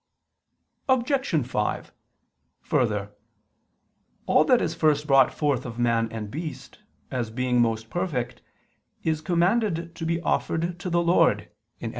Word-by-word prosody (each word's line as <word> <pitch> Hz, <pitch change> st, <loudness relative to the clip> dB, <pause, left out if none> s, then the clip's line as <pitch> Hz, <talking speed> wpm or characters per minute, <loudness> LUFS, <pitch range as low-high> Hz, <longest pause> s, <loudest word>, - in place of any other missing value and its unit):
Obj. 260 Hz, -, +1 dB
5: 105 Hz, -4 st, -2 dB, 0.7 s
Further, 105 Hz, -4 st, 0 dB, 1.1 s
all -, -, +4 dB
that -, -, +5 dB
is -, -, -1 dB
first 150 Hz, -1 st, +2 dB
brought 135 Hz, -3 st, +5 dB
forth 145 Hz, -5 st, 0 dB
of 120 Hz, -1 st, -7 dB
man 115 Hz, -2 st, +1 dB
and 105 Hz, -2 st, -6 dB
beast, 155 Hz, +2 st, -7 dB, 0.3 s
as 120 Hz, -3 st, -2 dB
being 125 Hz, +1 st, +1 dB
most 115 Hz, -1 st, -1 dB
perfect, 125 Hz, -10 st, -3 dB, 0.6 s
is 160 Hz, -1 st, 0 dB
commanded 175 Hz, 0 st, +1 dB
to 165 Hz, -, -5 dB
be 165 Hz, 0 st, 0 dB
offered 170 Hz, +1 st, -1 dB
to 180 Hz, -, -4 dB
the 170 Hz, 0 st, +2 dB
Lord 170 Hz, +1 st, +3 dB, 0.3 s
(Ex. -, -, -4 dB
150 Hz, 130 wpm, -25 LUFS, 120-170 Hz, 1.1 s, that